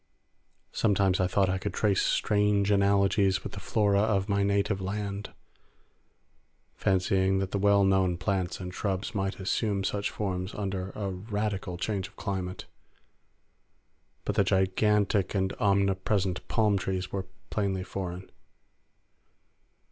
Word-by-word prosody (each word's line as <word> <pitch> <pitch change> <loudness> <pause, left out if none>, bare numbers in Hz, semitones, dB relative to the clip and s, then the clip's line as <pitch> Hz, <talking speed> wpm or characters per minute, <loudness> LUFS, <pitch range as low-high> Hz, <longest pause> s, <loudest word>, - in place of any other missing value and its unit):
Sometimes 100 -3 +2
I 90 - +2
thought 95 +1 +2
I 95 0 0
could - - -4
trace 100 -3 +2
strange 105 -1 +2
analogies 100 -1 +3
with - - -6
the 100 - -6
flora 100 -1 +2
of 100 -2 +1
my 100 -1 +1
native 100 0 +1
land, 100 +1 -4 1.4
fancying 95 0 +1
that 95 -1 -2
the 100 - -1
well 100 0 +4
known 95 -2 +2
plants 95 -2 -1
and 90 -1 -6
shrubs 95 0 -2
might 95 -1 -2
assume 100 +1 0
such 100 +1 -1
forms 95 -2 -3
under 95 -2 -3
a 100 -2 -3
radical 100 -1 -3
change 95 +1 -2
of - - -22
climate; 95 -2 -4 1.6
but 105 - 0
the 100 0 +3
gigantic 100 +1 +2
and 95 -1 0
omnipresent 100 -2 +1
palm 105 -3 +2
trees 95 0 -3
were 95 -1 -3 0.2
plainly 95 -3 -1
foreign. 95 -1 -5
100 Hz, 130 wpm, -28 LUFS, 95-100 Hz, 1.6 s, well